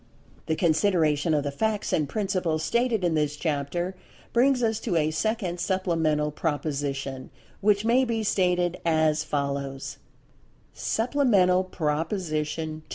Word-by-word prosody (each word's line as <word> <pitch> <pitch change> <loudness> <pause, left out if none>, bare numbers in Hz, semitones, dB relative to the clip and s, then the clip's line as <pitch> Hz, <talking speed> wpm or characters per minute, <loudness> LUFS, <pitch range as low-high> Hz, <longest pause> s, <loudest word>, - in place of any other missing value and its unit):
The 160 - +1
consideration 160 -2 +2
of 145 - +1
the 145 - -2
facts 215 +8 -1
and 150 -3 +1
principles 180 -5 -1
stated 235 -4 +1
in 175 -2 +2
this 150 -1 0
chapter 160 +4 -2 0.4
brings 250 +1 +3
us 220 -1 +1
to 180 - -2
a 155 -1 +2
second 180 +2 -1
Supplemental 165 -6 0
Proposition, 140 -4 -3 0.3
which 205 +1 +2
may 245 +3 +4
be 230 -3 -1
stated 180 -3 +1
as 155 -2 +2
follows: 140 -2 -3 0.7
Supplemental 220 -7 +2
Proposition 155 -2 -2
II. - - -13
165 Hz, 125 wpm, -26 LUFS, 150-200 Hz, 0.7 s, may